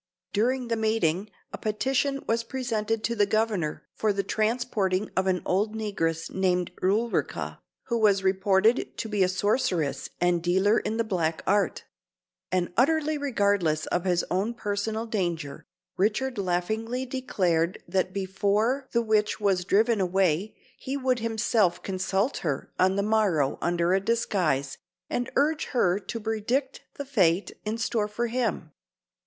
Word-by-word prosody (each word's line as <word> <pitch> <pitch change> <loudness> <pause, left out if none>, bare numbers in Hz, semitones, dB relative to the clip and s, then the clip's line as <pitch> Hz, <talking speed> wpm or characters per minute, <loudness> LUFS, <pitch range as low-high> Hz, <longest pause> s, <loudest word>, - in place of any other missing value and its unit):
During 245 +4 +1
the 230 - +1
meeting, 215 -4 0 0.2
a - - -5
petition 270 +5 0
was 230 +1 +1
presented 225 -3 -2
to 235 - 0
the 205 -2 +3
Governor 210 -7 0
for 215 - +1
the 200 0 -1
transporting 215 -3 0
of 190 0 +1
an 185 -1 +1
old 210 +4 0
negress 165 -7 -2
named 180 -2 +1
Ulrica, 215 +5 -1 0.2
who 235 -2 -1
was 200 -3 +3
reported 190 +4 +2
to - - -3
be 210 -2 -1
a 185 - +5
sorceress 180 - 0
and 175 -1 +2
dealer 190 +5 +3
in 220 - -3
the 230 - +2
black 165 -7 -1
art; 205 -1 +1 0.7
and, 180 -1 0
utterly 310 +4 +2
regardless 200 - +1
of 175 +1 0
his 180 -2 +1
own 205 +6 0
personal 220 +1 -2
danger, 175 -10 -3 0.3
Richard 220 +5 0
laughingly 220 +7 -1
declared 185 -10 0
that 185 +1 0
before 200 +7 0
the 235 -1 +2
witch 215 -1 +1
was 195 -4 +1
driven 215 +2 +3
away 190 +1 +1 0.2
he 270 +1 -3
would 255 -2 +1
himself 220 -4 +1
consult 190 +5 -1
her 145 -5 -3
on 190 +1 +4
the 200 - +1
morrow 200 -10 +1
under 175 +1 +1
a 190 - +4
disguise, 185 - 0 0.3
and 245 +1 -1
urge 300 +2 +2
her 195 -7 +1
to 230 +3 -6
predict 230 +5 -1
the 285 - -5
fate 190 -8 +2
in 215 +2 -2
store 225 -2 0
for 225 +3 -2
him. 230 -9 -2
205 Hz, 150 wpm, -27 LUFS, 185-230 Hz, 0.7 s, a